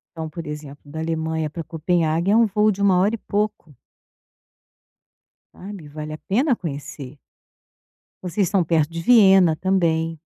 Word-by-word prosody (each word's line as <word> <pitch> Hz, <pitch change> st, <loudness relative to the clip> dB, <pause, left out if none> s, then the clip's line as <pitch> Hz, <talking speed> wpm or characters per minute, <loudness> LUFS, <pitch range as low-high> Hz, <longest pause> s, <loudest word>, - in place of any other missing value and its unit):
Então, 160 Hz, -1 st, -5 dB
por 165 Hz, +2 st, -8 dB
exemplo 150 Hz, -1 st, -8 dB
da 155 Hz, +2 st, -8 dB
Alemanha 160 Hz, -1 st, -2 dB
para 165 Hz, +2 st, -6 dB
Copenhague 165 Hz, +2 st, 0 dB
é -, -, +4 dB
um 230 Hz, 0 st, +5 dB
voo 210 Hz, +1 st, +2 dB
de 200 Hz, 0 st, -5 dB
1 195 Hz, -2 st, +4 dB
hora 205 Hz, +5 st, +2 dB
e -, -, -7 dB
pouco. 210 Hz, -7 st, -3 dB, 1.8 s
Sabe, 190 Hz, -5 st, -10 dB
vale 155 Hz, +1 st, -7 dB
a -, -, -6 dB
pena 250 Hz, -, +1 dB
conhecer. 145 Hz, -, -7 dB, 1.1 s
Vocês 185 Hz, +2 st, 0 dB
estão 195 Hz, 0 st, +2 dB
perto 160 Hz, -1 st, +1 dB
de 165 Hz, 0 st, -5 dB
Viena 190 Hz, -5 st, +5 dB
também. 165 Hz, -3 st, 0 dB
165 Hz, 150 wpm, -22 LUFS, 155-195 Hz, 1.8 s, um